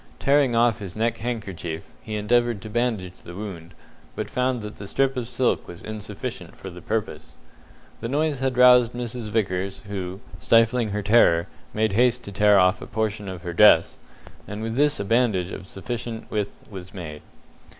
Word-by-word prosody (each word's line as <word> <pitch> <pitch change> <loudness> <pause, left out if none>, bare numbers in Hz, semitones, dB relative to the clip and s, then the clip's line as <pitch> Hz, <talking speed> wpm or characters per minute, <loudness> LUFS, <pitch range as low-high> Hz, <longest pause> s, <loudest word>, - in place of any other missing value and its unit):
Tearing 140 -3 +3
off 115 -1 +3
his 95 -4 -7
neck 115 +1 0
handkerchief, 100 -8 -4 0.2
he 110 - -5
endeavoured 120 +1 +2
to 110 - -8
bandage 110 -6 -1
the 85 - -10
wound, 85 -5 -8 0.4
but - - -4
found 125 -2 0
that 105 0 -8
the 100 - -8
strip 135 +5 +1
of 125 -2 -3
silk 125 +1 0
was 85 - -10
insufficient 110 -1 -6
for 95 - -9
the 90 0 -11
purpose. 80 -9 -4 0.6
The 115 - -4
noise 145 0 0
had 130 -1 -1
roused 125 -1 +7
Mrs. 120 -2 -4
Vickers, 95 -3 -1
who, 95 -2 -5 0.2
stifling 115 0 +3
her 105 +1 -2
terror, 100 -6 +5 0.3
made 110 0 +1
haste 120 +2 +3
to 100 - -8
tear 105 +1 +5
off 90 +2 +4
a - - -7
portion 110 -2 -2
of 90 -2 -7
her 85 - -4
dress, 105 +5 +6 0.5
and 105 +1 -5
with 115 0 -3
this 145 +2 +2
a 100 - -2
bandage 105 -5 +2
of 95 - -8
sufficient 115 +3 -6
width 105 -2 -2 0.2
was 95 -1 -9
made. 75 -5 -7
110 Hz, 180 wpm, -24 LUFS, 95-120 Hz, 0.6 s, roused